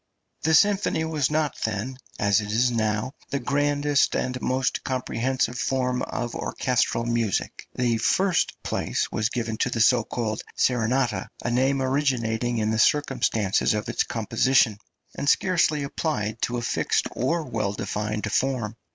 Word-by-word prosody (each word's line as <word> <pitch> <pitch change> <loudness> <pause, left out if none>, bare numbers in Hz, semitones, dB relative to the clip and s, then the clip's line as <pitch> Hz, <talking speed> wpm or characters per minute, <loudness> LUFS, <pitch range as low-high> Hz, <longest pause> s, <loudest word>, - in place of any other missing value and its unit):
The 160 +1 +3
symphony 195 -2 +3
was 155 -4 0
not 155 -1 -1
then, 110 +4 -3 0.2
as 100 0 +3
it 105 0 -5
is 120 +3 +2
now, 110 +2 -1 0.2
the 140 - -1
grandest 145 +1 +1
and 125 0 -2
most 130 0 0
comprehensive 125 -1 -1
form 125 -1 0
of 120 -1 -3
orchestral 125 -2 0
music. 115 -4 -1
The 120 -2 +1
first 190 - +1
place - - -2
was 110 +1 0
given 115 -3 -3
to 125 - +1
the 120 - -3
so 120 +1 +5
called 110 -2 -3 0.2
serenata, 120 -3 +1 0.2
a 120 - -1
name 135 +2 +2
originating 120 -4 0
in 110 0 0
the 110 - 0
circumstances 115 -9 +2
of 105 - -3
its - - 0
composition, 115 0 +2 0.3
and 140 - -1
scarcely 165 -5 +2
applied 115 -7 -2
to 120 - -1
a 120 - -3
fixed - - 0
or 165 +7 0
well 110 -7 -2
defined 105 0 -3
form. 120 -5 -1
125 Hz, 150 wpm, -25 LUFS, 110-135 Hz, 0.3 s, so